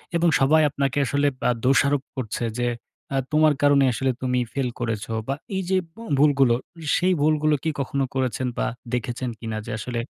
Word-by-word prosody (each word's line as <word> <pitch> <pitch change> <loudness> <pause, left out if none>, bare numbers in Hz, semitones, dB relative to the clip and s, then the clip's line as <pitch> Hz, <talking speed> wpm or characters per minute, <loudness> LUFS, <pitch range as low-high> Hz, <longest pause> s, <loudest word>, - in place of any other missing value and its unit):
এবং 170 +1 +3
সবাই 155 +4 +5
আপনাকে 140 -1 -1
আসলে 140 +3 +1 0.2
আ - - +4
দোষারোপ 140 +1 +3
করছে 120 -3 -3 0.2
যে 120 - +1 0.5
আ - - +2
তোমার 155 0 +4
কারণে 145 -1 +5
আসলে 130 +3 0
তুমি 125 -1 +1
ফেইল 135 -3 -1
করেছো 115 -2 -3 0.2
বা 135 - 0 0.2
এই 190 - -1
যে 190 - +3 0.2
ব - - -32 0.2
ভুলগুলো, 140 -5 +4 0.4
সেই 185 +1 +2
ভুলগুলো 155 0 +3
কি 160 - +1
কখনো 140 0 -1
করেছেন 130 -1 -1
বা - - 0 0.3
দেখেছেন 125 +1 -2
কিনা 110 -2 -4
যে, - - -6
আসলে 120 +2 -3
135 Hz, 180 wpm, -24 LUFS, 125-145 Hz, 0.5 s, সবাই